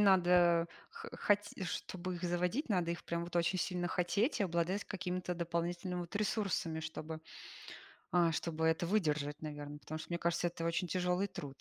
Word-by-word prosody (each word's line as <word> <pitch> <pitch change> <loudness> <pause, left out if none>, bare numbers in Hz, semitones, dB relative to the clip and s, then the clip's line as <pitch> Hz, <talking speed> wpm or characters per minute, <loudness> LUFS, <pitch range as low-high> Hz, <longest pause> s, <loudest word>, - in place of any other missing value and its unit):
надо 175 -3 +5 0.2
хо 460 0 -8
хоте 205 -2 +1
чтобы 180 +1 -3
их 170 - -9
заводить, 180 - 0
надо 180 -4 +2
их 170 - -7
прям 170 0 -1
вот 175 0 -4
очень 175 +2 +2
сильно 175 0 0
хотеть, 200 - +1
и - - +4
обладать 175 +3 0
какими-то 180 -2 -2
дополнительными 175 +1 -1
вот 175 +3 -5
ресурсами, 195 -6 0
чтобы, 160 0 -5 0.9
а, 170 -2 +5
чтобы 160 +1 -1
это 160 +1 +3
выдержать, 150 -7 +1
наверно. 145 -1 -5
Потому 155 +1 -5
что, 155 - -8
мне 170 - -1
кажется, 170 +1 +1
это 165 -1 -4
очень 170 +2 +1
тяжёлый 180 +2 +1
труд 140 -7 -7
175 Hz, 170 wpm, -35 LUFS, 165-185 Hz, 0.9 s, надо